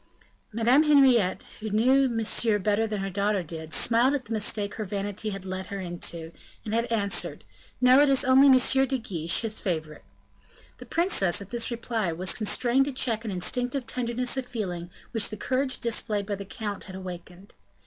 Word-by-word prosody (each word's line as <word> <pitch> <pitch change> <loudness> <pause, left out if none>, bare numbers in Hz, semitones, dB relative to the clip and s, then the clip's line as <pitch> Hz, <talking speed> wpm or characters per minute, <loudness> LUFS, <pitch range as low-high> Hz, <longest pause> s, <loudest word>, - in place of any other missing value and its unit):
Madame 235 +6 +4
Henriette, 265 -10 +4 0.2
who 220 - -5
knew 260 +6 +3
Monsieur 225 -1 +2
better 210 +2 0
than 210 -2 -3
her 195 - -3
daughter 200 0 0
did, 160 -1 -8
smiled 240 - +3
at 270 - -4
the 225 - -5
mistake 205 -1 -1
her 220 - -4
vanity 205 +2 -4
had 195 -2 -7
led 185 0 -5
her 200 - -5
into, 170 -2 -5 0.3
and 215 - -4
had 230 +1 0
answered, 200 -3 -1 0.4
"No; 255 +2 +6
it 290 - +4
is 275 +1 +2
only 260 +2 +6
M. 265 0 +5
de 265 - 0
Guiche, 170 -8 -1
his 220 -1 -3
favorite." 160 -5 -4 0.8
The - - -11
princess, 330 - +1
at 200 -1 -10
this 235 -1 -1
reply, 230 -5 -2
was 180 +3 -2
constrained 245 +4 +1
to 285 - -2
check 240 -4 0
an 225 - -4
instinctive 245 +8 -1
tenderness 245 +1 -1
of 260 -1 -3
feeling 180 -8 -5 0.2
which 225 -3 +1
the 215 - -7
courage 260 +5 0
displayed 215 -3 -1
by 205 - -3
the 200 0 -5
count 205 0 -6
had 190 - -9
awakened. 185 +1 -9
220 Hz, 185 wpm, -26 LUFS, 195-250 Hz, 0.8 s, No